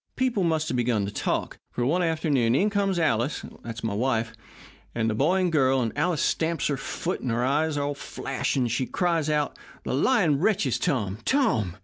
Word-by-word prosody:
People 250 Hz, -7 st, +1 dB
must 160 Hz, -2 st, +1 dB
have -, -, -1 dB
begun 115 Hz, -4 st, +1 dB
to 100 Hz, -, -4 dB
talk, -, -, -2 dB
for 120 Hz, -, -1 dB
one 170 Hz, +8 st, +2 dB
afternoon 155 Hz, -8 st, +1 dB
in 205 Hz, +8 st, +2 dB
comes 200 Hz, -2 st, +1 dB
Alice 140 Hz, -4 st, 0 dB, 0.2 s
that's 115 Hz, -1 st, -7 dB
my 110 Hz, -2 st, -1 dB
wife 115 Hz, 0 st, 0 dB, 0.6 s
and 115 Hz, -1 st, 0 dB
the 110 Hz, -, +1 dB
boy 155 Hz, -, +2 dB
and 180 Hz, -2 st, +1 dB
girl, 135 Hz, -4 st, +3 dB
and 115 Hz, -3 st, -2 dB
Alice 175 Hz, -4 st, +1 dB
stamps 165 Hz, -1 st, 0 dB
her 145 Hz, -, +1 dB
foot, 170 Hz, +6 st, -3 dB
and 130 Hz, -, -3 dB
her 120 Hz, +1 st, 0 dB
eyes 150 Hz, +3 st, +1 dB, 0.2 s
flash, 135 Hz, 0 st, -3 dB
and 125 Hz, -4 st, +1 dB
she 125 Hz, +2 st, 0 dB
cries 170 Hz, -4 st, 0 dB
out, 150 Hz, -1 st, 0 dB, 0.3 s
'The -, -, -3 dB
lying 160 Hz, -, +3 dB
wretches 205 Hz, +4 st, +1 dB
Tom, 110 Hz, -, -1 dB
Tom!' 195 Hz, -, +1 dB
145 Hz, 195 wpm, -26 LUFS, 120-170 Hz, 0.6 s, girl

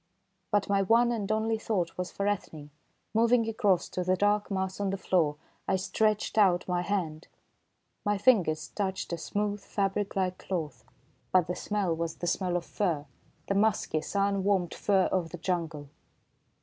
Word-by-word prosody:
But 205 Hz, -1 st, +1 dB
my 200 Hz, -1 st, +2 dB
one 230 Hz, +5 st, +4 dB
and 215 Hz, -3 st, -2 dB
only 220 Hz, +1 st, +1 dB
thought 185 Hz, -7 st, -1 dB
was 180 Hz, 0 st, -3 dB
for 200 Hz, +3 st, -2 dB
Ethne. 155 Hz, -7 st, -3 dB, 0.4 s
Moving 230 Hz, +1 st, +3 dB
across 205 Hz, -5 st, +2 dB
to 180 Hz, -, -2 dB
the 185 Hz, +1 st, +2 dB
dark 205 Hz, +2 st, +1 dB
mass 190 Hz, -1 st, -2 dB
on 200 Hz, -1 st, 0 dB
the 195 Hz, -, -1 dB
floor, 165 Hz, -6 st, +1 dB, 0.3 s
I 190 Hz, -, +2 dB
stretched 215 Hz, +3 st, +1 dB
out 180 Hz, -4 st, +4 dB
my 180 Hz, -1 st, 0 dB
hand. 175 Hz, -5 st, -2 dB, 0.8 s
My 205 Hz, -1 st, +1 dB
fingers 175 Hz, -9 st, +3 dB
touched 190 Hz, -3 st, -3 dB
a -, -, -1 dB
smooth, 205 Hz, +3 st, -2 dB
fabric 200 Hz, 0 st, -1 dB
like 185 Hz, -1 st, 0 dB
cloth, 165 Hz, -6 st, -4 dB, 0.5 s
but 185 Hz, -2 st, +4 dB
the 180 Hz, -, -3 dB
smell 200 Hz, -5 st, -1 dB
was 165 Hz, 0 st, -3 dB
the -, -, -5 dB
smell 175 Hz, +1 st, 0 dB
of 175 Hz, -, -5 dB
fur, 165 Hz, -8 st, -1 dB, 0.4 s
the -, -, 0 dB
musky, 200 Hz, -6 st, +1 dB
sun 200 Hz, +1 st, 0 dB
warmed 190 Hz, -4 st, +1 dB
fur 195 Hz, -2 st, +2 dB
of 180 Hz, -3 st, 0 dB
the 175 Hz, -, -7 dB
jungle! 165 Hz, -4 st, -3 dB
190 Hz, 170 wpm, -29 LUFS, 175-205 Hz, 0.8 s, one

